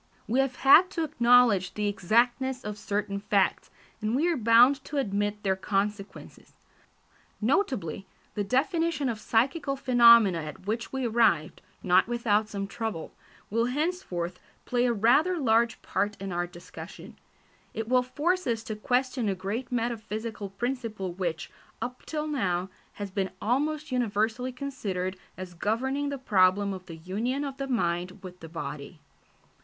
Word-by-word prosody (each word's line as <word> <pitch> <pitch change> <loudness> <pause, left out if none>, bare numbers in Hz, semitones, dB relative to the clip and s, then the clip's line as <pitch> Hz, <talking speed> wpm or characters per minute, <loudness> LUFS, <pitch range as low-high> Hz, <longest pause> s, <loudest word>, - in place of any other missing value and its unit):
We 240 +5 +1
have 270 -2 +1
had 325 +8 +7
to 330 - +1
acknowledge 235 - +4
the 210 -1 -1
exactness 240 +6 +1
of 210 0 -6
certain 200 -1 -2
facts, 200 -1 +1 0.3
and 215 +2 0
we 310 +6 +2
are 340 - +1
bound 245 +3 +5
to 295 - -5
admit 205 -4 -1
their 190 -2 +2
consequences. 200 +1 -4 0.9
Notably, 215 - -1 0.3
the 205 - -1
definition 305 - 0
of 225 -2 -3
psychical 275 +6 0
phenomena 235 -8 +6
at 155 +3 -8
which 225 +3 -3
we 265 -1 -2
arrived, 220 -9 +2 0.2
not 185 +2 +4
without 220 -3 +1
some 200 -2 -3
trouble, 210 -5 -5 0.4
will 230 +2 +2
henceforth 250 - -2 0.3
play 245 0 +1
a - - +2
rather 255 - +3
large 230 -4 +2
part 205 +2 -1
in 195 0 -5
our 175 0 -1
discussion. 175 0 -11 0.6
It 225 0 -3
will 250 +1 +4
force 330 +8 -1
us 225 -2 -1
to 220 - -5
question 250 +1 0
a 195 - 0
great 200 +8 -4
metaphysical 220 -3 -3
principle 215 -3 -4
which, 170 -3 -3 0.3
up 250 +1 -6
till 305 -1 -2
now, 195 -11 -1 0.2
has 205 -2 -6
been 190 -1 -1
almost 295 +6 -1
universally 235 +1 0
considered 210 -9 -4 0.2
as 185 -1 -7
governing 265 +10 -1
the 280 - -3
problem 200 -4 +3
of 185 -1 -9
the 165 - -8
union 220 - -2
of 275 -2 -5
the 275 - -4
mind 180 -6 -1
with 180 -1 -10
the 165 - -10
body. 150 0 -7
225 Hz, 150 wpm, -27 LUFS, 195-255 Hz, 0.9 s, had